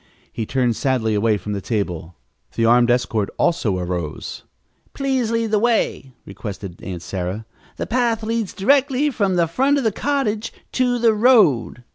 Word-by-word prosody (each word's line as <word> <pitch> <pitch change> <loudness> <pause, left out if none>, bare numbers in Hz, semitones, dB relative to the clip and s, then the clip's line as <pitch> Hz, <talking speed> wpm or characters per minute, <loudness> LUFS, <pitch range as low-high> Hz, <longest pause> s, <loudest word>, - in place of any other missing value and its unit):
He 110 - -4
turned 125 -3 +1
sadly 125 -5 0
away 105 +1 +2
from 105 +2 -5
the 100 - -3
table. 90 -6 -3 0.4
The 115 - +1
armed 120 +1 +5
escort 115 -4 +1
also 115 - +1
arose. 90 -4 -4 0.5
"Please 265 -4 0
lead 230 -1 -1
the 215 - +3
way," 225 - 0
requested 100 -3 -8
Aunt 90 -2 -6
Sarah. 95 +3 -4 0.3
"The - - -3
path 235 -2 0
leads 225 -2 -2
directly 275 +5 +2
from 200 -6 0
the 170 -1 +3
front 270 - +1
of 275 - 0
the 220 - +2
cottage 230 -4 -1 0.2
to 250 -1 +1
the 230 -2 +3
road." 210 - +3
165 Hz, 160 wpm, -21 LUFS, -, 0.5 s, armed